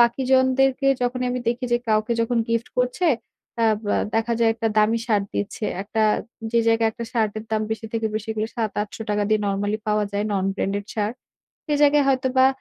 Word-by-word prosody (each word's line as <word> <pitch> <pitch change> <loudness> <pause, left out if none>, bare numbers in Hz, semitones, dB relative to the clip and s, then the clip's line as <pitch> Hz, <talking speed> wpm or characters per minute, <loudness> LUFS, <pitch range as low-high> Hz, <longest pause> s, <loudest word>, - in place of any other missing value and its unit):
বাকিজনদেরকে 260 +2 +3
যখনই 250 +1 0
আমি 250 - -2
দেখি 240 +1 -1
যে 240 - +4
কাউকে 215 +2 +2
যখন 230 +1 +1
gift 230 0 0
করছে 250 +8 +1 0.5
অ্যা 230 - +3 0.2
ব্যা - - +1 0.2
দেখা 225 +1 +1
যায় 230 -1 +4
একটা 225 0 -1
দামি 220 +2 +3
shirt 210 -3 +2
দিচ্ছে। 205 +2 -3 0.2
একটা 220 +2 -1 0.5
যে 235 - +4
জায়গায় 225 0 +3
একটা 235 0 -6
shirt 220 -3 +1
এর 215 - -8
দাম 215 0 +1
বেশি 220 0 -3
থেকে 225 -1 0
বেশি 220 +1 -3
হলে 215 +1 -2
৳৭-৮০০ 210 -1 -2
দিয়ে 215 0 +2
normally 205 +2 -1
পাওয়া 210 0 +2
যায় 205 +1 -1
non 195 -2 0
branded 200 +1 -2
shirt 215 +1 -1 0.5
সে 300 - 0
জায়গায় 290 -1 +5
হয়তোবা 260 0 +3
225 Hz, 185 wpm, -23 LUFS, 215-250 Hz, 0.5 s, জায়গায়